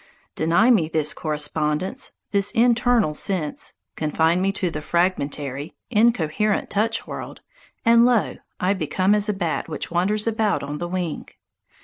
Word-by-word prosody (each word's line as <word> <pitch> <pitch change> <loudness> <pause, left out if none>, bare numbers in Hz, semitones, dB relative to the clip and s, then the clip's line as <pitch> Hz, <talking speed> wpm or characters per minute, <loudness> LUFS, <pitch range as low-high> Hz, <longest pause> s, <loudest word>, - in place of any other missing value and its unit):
Deny 170 +10 +3
me 170 -10 +3
this 155 -2 -1
correspondence, 150 - -2 0.2
this 200 -1 +1
internal 235 -6 +3
sense, 155 -2 -3 0.2
confine 160 +3 +1
me 195 +1 +2
to 185 -3 -1
the 150 - -5
fragmentary, 150 -5 -1 0.2
incoherent 210 -3 +2
touch 220 +2 0
world, - - -7 0.4
and 230 0 +6
lo, 240 -3 +2 0.2
I 185 +2 +2
become 190 0 +1
as 210 0 +1
a - - +2
bat 175 -4 -2
which 155 - -5
wanders 200 +5 +1
about 220 -5 0
on 145 +1 -5
the 175 - -3
wing. 175 -3 -3
185 Hz, 140 wpm, -23 LUFS, 155-215 Hz, 0.4 s, and